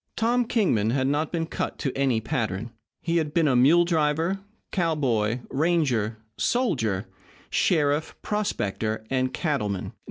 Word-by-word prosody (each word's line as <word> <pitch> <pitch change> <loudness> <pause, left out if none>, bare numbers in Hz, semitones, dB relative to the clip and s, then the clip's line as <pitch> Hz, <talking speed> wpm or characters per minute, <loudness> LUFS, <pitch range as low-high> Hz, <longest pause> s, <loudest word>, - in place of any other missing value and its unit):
Tom 240 +2 +2
Kingman 175 - +2
had 130 +2 +1
not 145 +3 0
been 165 -2 -1
cut - - -4
to 135 - -3
any 135 -4 +2
pattern. 110 -4 -2 0.3
He 170 0 +1
had 155 -2 -1
been 165 -2 +4 0.2
mule 170 +6 +6
driver, 165 +3 +1 0.3
cowboy, 130 - +1
ranger, 135 -8 +1 0.2
soldier, 125 - +1 0.5
sheriff, 150 -2 +1
prospector, 110 - -2
and 130 -1 +1
cattleman. 125 - -2
145 Hz, 125 wpm, -25 LUFS, 115-170 Hz, 0.5 s, mule